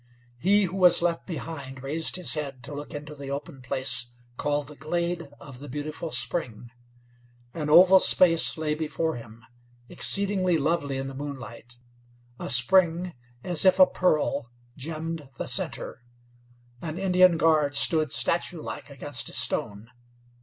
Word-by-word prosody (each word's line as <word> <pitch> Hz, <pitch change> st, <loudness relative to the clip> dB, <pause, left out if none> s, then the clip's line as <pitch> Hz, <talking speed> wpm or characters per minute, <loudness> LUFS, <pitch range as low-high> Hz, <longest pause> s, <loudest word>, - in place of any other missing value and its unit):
He 200 Hz, +6 st, +3 dB
who 190 Hz, +1 st, -4 dB
was 180 Hz, -2 st, +4 dB
left 170 Hz, -1 st, -2 dB
behind 140 Hz, -6 st, -8 dB
raised 155 Hz, +4 st, -1 dB
his 180 Hz, -2 st, +2 dB
head 140 Hz, -5 st, -5 dB
to 145 Hz, -, -9 dB
look 145 Hz, +1 st, -8 dB
into 150 Hz, +1 st, -8 dB
the 140 Hz, -2 st, -10 dB
open 140 Hz, 0 st, -7 dB
place 125 Hz, -1 st, +1 dB, 0.3 s
called 145 Hz, +1 st, -2 dB
the 150 Hz, -, -13 dB
glade 170 Hz, +2 st, -4 dB
of 130 Hz, -3 st, -11 dB
the 145 Hz, +1 st, -11 dB
Beautiful 150 Hz, +4 st, -6 dB
Spring. 120 Hz, -8 st, -3 dB, 0.8 s
An 150 Hz, -2 st, -5 dB
oval 185 Hz, +4 st, +7 dB
space 165 Hz, -3 st, +4 dB
lay 155 Hz, -1 st, -2 dB
before 160 Hz, 0 st, -3 dB
him, 115 Hz, +1 st, -14 dB, 0.4 s
exceedingly 195 Hz, -3 st, +3 dB
lovely 145 Hz, -2 st, -2 dB
in 135 Hz, -, -4 dB
the 135 Hz, -, -8 dB
moonlight; 120 Hz, -4 st, -10 dB, 0.6 s
a -, -, -6 dB
spring, 175 Hz, +7 st, +4 dB, 0.3 s
as 175 Hz, -4 st, +4 dB
if 185 Hz, -1 st, +4 dB
a 185 Hz, -, +7 dB
pearl, 155 Hz, -10 st, -1 dB, 0.3 s
gemmed 155 Hz, 0 st, -7 dB
the -, -, -5 dB
center. -, -, -1 dB, 0.8 s
An 160 Hz, 0 st, -6 dB
Indian 185 Hz, -2 st, +3 dB
guard 155 Hz, -3 st, +1 dB
stood 155 Hz, +2 st, +3 dB
statuelike 170 Hz, -3 st, -1 dB
against 140 Hz, -1 st, -1 dB
a -, -, -10 dB
stone. 105 Hz, +3 st, -2 dB
155 Hz, 145 wpm, -25 LUFS, 140-170 Hz, 0.8 s, oval